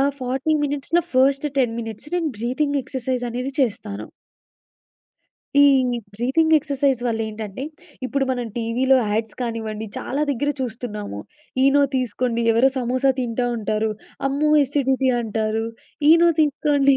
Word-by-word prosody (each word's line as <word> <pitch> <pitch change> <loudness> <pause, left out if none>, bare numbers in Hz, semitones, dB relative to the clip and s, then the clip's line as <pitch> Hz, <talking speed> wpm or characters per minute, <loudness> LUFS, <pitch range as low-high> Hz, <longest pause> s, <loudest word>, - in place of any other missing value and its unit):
ఆ - - +4 0.2
40 265 +4 -1
మినిట్స్‌లో 290 +4 0
first 275 +3 +3
10 240 -4 +2
minutes 225 +5 -7
నేను 340 -3 0
బ్రీతింగ్ 280 +5 0
ఎక్సర్‌సైజ్ 255 -2 -3
అనేది 250 +3 -3
చేస్తాను. 215 -5 -2 1.6
ఈ - - +8 0.5
బ్రీతింగ్ 315 +8 +3
ఎక్సర్సైజ్ 280 -3 0
వల్ల 225 -1 -1
ఏంటంటే 215 +2 -6 0.4
ఇప్పుడు 275 +1 0
మనం 245 -1 -2
టీవీలో 240 +3 +2 0.2
యాడ్స్ 220 +1 -1
కానివ్వండి 220 -2 -3
చాలా 280 +3 -2
దగ్గర 285 +2 0
చూస్తున్నాము. 220 - -5 0.4
ఈనో 275 +1 +5
తీసుకోండి, 245 -1 -1
ఎవరో 235 +4 +4
సమోసా 255 +2 +2
తింటా 245 0 -1
ఉంటారు. 215 0 -1 0.4
అమ్మో 285 +3 +1
ఎసిడిటీ 265 -1 +1
అంటారు. 220 0 -1 0.4
ఈనో 335 +1 +7
తీసుకోండి, 285 -2 +3
255 Hz, 125 wpm, -22 LUFS, 225-275 Hz, 1.6 s, ఈ